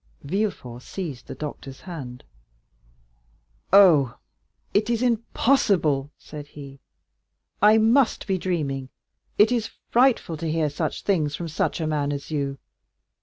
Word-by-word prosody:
Villefort 140 Hz, -, -3 dB
seized 155 Hz, -5 st, -7 dB
the -, -, -7 dB
doctor's 140 Hz, -3 st, -7 dB
hand. 135 Hz, -9 st, -8 dB, 1.5 s
"Oh, 165 Hz, -, +6 dB, 0.6 s
it 210 Hz, +2 st, +2 dB
is 235 Hz, 0 st, 0 dB
impossible," 210 Hz, -, +1 dB
said 150 Hz, -1 st, -10 dB
he, 140 Hz, -2 st, -11 dB, 0.8 s
"I 210 Hz, +2 st, +6 dB
must 230 Hz, +3 st, +3 dB
be 190 Hz, -2 st, -1 dB
dreaming! 140 Hz, -8 st, -2 dB, 0.5 s
It 210 Hz, +3 st, +5 dB
is 235 Hz, -3 st, 0 dB, 0.2 s
frightful 240 Hz, -9 st, +3 dB
to 160 Hz, +1 st, -3 dB
hear 155 Hz, -2 st, 0 dB
such 155 Hz, +1 st, -3 dB
things 155 Hz, -7 st, 0 dB
from 170 Hz, 0 st, -5 dB
such 160 Hz, -, -1 dB
a 160 Hz, -, -1 dB
man 150 Hz, -2 st, -1 dB
as 140 Hz, +2 st, -6 dB
you! 140 Hz, -2 st, -2 dB
160 Hz, 125 wpm, -24 LUFS, 140-210 Hz, 1.5 s, Oh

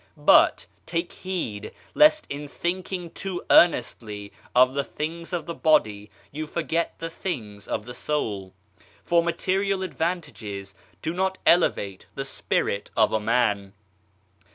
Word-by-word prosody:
But, -, -, +5 dB, 0.2 s
take 170 Hz, +1 st, -2 dB
heed, 170 Hz, -, -4 dB, 0.2 s
lest 305 Hz, +1 st, +5 dB
in 145 Hz, +1 st, -5 dB
thinking 180 Hz, +2 st, -3 dB
too 190 Hz, -3 st, -5 dB
earnestly 105 Hz, -11 st, +3 dB, 0.2 s
of 130 Hz, +1 st, +6 dB
the 140 Hz, 0 st, 0 dB
things 165 Hz, +5 st, -5 dB
of 175 Hz, -3 st, -2 dB
the 170 Hz, -, -4 dB
body 110 Hz, -12 st, +2 dB, 0.2 s
you 155 Hz, +2 st, -5 dB
forget 165 Hz, +1 st, -1 dB
the 165 Hz, -, -4 dB
things 115 Hz, -, -5 dB
of 105 Hz, -, -3 dB
the 125 Hz, -, -7 dB
soul: 105 Hz, -10 st, -3 dB, 0.5 s
for 170 Hz, 0 st, +3 dB
material 190 Hz, +3 st, 0 dB
advantages 120 Hz, -, -4 dB, 0.3 s
do 160 Hz, -, -1 dB
not 190 Hz, +1 st, 0 dB
elevate 100 Hz, -, +2 dB
the 135 Hz, -, -3 dB
Spirit 100 Hz, -6 st, -1 dB
of -, -, +4 dB
a 110 Hz, -, +2 dB
man. 105 Hz, -3 st, +1 dB
155 Hz, 130 wpm, -25 LUFS, 105-175 Hz, 0.5 s, of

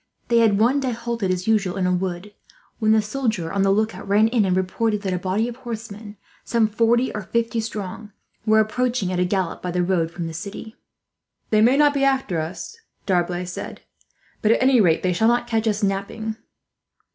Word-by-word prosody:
They 235 Hz, -1 st, +4 dB
had 220 Hz, -3 st, +4 dB
one 245 Hz, +6 st, +3 dB
day 260 Hz, -3 st, -1 dB
halted 230 Hz, -3 st, -3 dB
as 185 Hz, +1 st, -2 dB
usual 200 Hz, -4 st, +1 dB
in 185 Hz, -, 0 dB
a 180 Hz, -, +2 dB
wood, 185 Hz, +2 st, -3 dB, 0.5 s
when 215 Hz, -2 st, +2 dB
the 220 Hz, -1 st, +4 dB
soldier 215 Hz, -7 st, -2 dB
on 200 Hz, -, +1 dB
the 195 Hz, -, +3 dB
lookout 215 Hz, +1 st, 0 dB
ran 210 Hz, +3 st, +4 dB
in 225 Hz, -3 st, +2 dB
and 185 Hz, -1 st, +1 dB
reported 210 Hz, +3 st, -1 dB
that 190 Hz, -2 st, -1 dB
a 180 Hz, -, -1 dB
body 195 Hz, +5 st, 0 dB
of 240 Hz, 0 st, -7 dB
horsemen, 220 Hz, -4 st, -8 dB, 0.3 s
some 230 Hz, -2 st, +2 dB
forty 230 Hz, +3 st, +1 dB
or 210 Hz, -, -4 dB
fifty 230 Hz, +3 st, -1 dB
strong, 215 Hz, -1 st, -6 dB, 0.3 s
were 215 Hz, 0 st, +4 dB
approaching 225 Hz, -2 st, 0 dB
at 180 Hz, -, -1 dB
a 180 Hz, -, +2 dB
gallop 185 Hz, -2 st, -2 dB
by 180 Hz, -, -4 dB
the 180 Hz, 0 st, 0 dB
road 175 Hz, -3 st, +1 dB
from 170 Hz, 0 st, -6 dB
the 165 Hz, -, -5 dB
city. 200 Hz, +5 st, -8 dB, 0.8 s
"They 215 Hz, -1 st, +4 dB
may 245 Hz, +5 st, +5 dB
not 295 Hz, -1 st, +4 dB
be 280 Hz, -1 st, 0 dB
after 265 Hz, -11 st, +1 dB
us," 165 Hz, +2 st, -6 dB, 0.3 s
D'Arblay 180 Hz, -1 st, 0 dB
said, 180 Hz, -, -7 dB, 0.6 s
"but 215 Hz, -, +3 dB
at -, -, +3 dB
any 260 Hz, -3 st, +5 dB
rate, 165 Hz, -5 st, +2 dB
they 180 Hz, -1 st, +1 dB
shall 220 Hz, +6 st, +2 dB
not 240 Hz, +1 st, +2 dB
catch 225 Hz, -1 st, -1 dB
us 210 Hz, 0 st, 0 dB
napping." 200 Hz, +3 st, -2 dB
215 Hz, 205 wpm, -22 LUFS, 185-230 Hz, 0.8 s, may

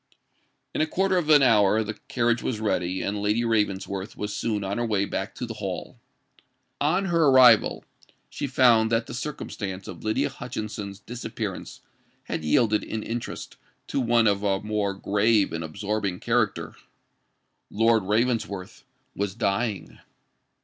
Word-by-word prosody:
In -, -, 0 dB
a 155 Hz, -, +2 dB
quarter 190 Hz, +3 st, +1 dB
of 155 Hz, -3 st, -4 dB
an 145 Hz, -2 st, +7 dB
hour 110 Hz, -3 st, +4 dB
the 110 Hz, +1 st, -4 dB
carriage 120 Hz, -1 st, +1 dB
was 115 Hz, -4 st, -2 dB
ready; 95 Hz, -4 st, -1 dB
and 100 Hz, +1 st, -2 dB
Lady 105 Hz, +3 st, +1 dB
Ravensworth 100 Hz, -3 st, -1 dB
was 105 Hz, 0 st, -4 dB
soon 105 Hz, -1 st, -1 dB
on 100 Hz, +4 st, -2 dB
her 120 Hz, -, 0 dB
way 100 Hz, -3 st, +1 dB
back -, -, -4 dB
to -, -, -4 dB
the -, -, -6 dB
Hall. -, -, -6 dB, 0.8 s
On 180 Hz, +7 st, +2 dB
her 170 Hz, -4 st, +3 dB
arrival, 125 Hz, -5 st, +6 dB, 0.4 s
she 145 Hz, -, -4 dB
found 120 Hz, -4 st, +4 dB
that 115 Hz, 0 st, +1 dB
the -, -, -8 dB
circumstance 105 Hz, -8 st, -5 dB
of 85 Hz, -, -9 dB
Lydia 110 Hz, 0 st, 0 dB
Hutchinson's 105 Hz, -4 st, -6 dB
disappearance 110 Hz, -2 st, -6 dB, 0.4 s
had -, -, -4 dB
yielded 105 Hz, +7 st, +2 dB
in 110 Hz, -1 st, -4 dB
interest 115 Hz, +1 st, -6 dB, 0.3 s
to -, -, -1 dB
one 120 Hz, -2 st, +3 dB
of 100 Hz, -2 st, +2 dB
a 100 Hz, -2 st, +1 dB
more 105 Hz, -2 st, -1 dB
grave 105 Hz, -1 st, +2 dB
and 80 Hz, 0 st, -3 dB
absorbing 100 Hz, +3 st, -3 dB
character. -, -, 0 dB, 1.0 s
Lord 115 Hz, +1 st, +3 dB
Ravensworth 105 Hz, -2 st, -1 dB, 0.3 s
was 100 Hz, -1 st, -2 dB
dying! 110 Hz, -1 st, -2 dB
110 Hz, 150 wpm, -25 LUFS, 100-120 Hz, 1.0 s, an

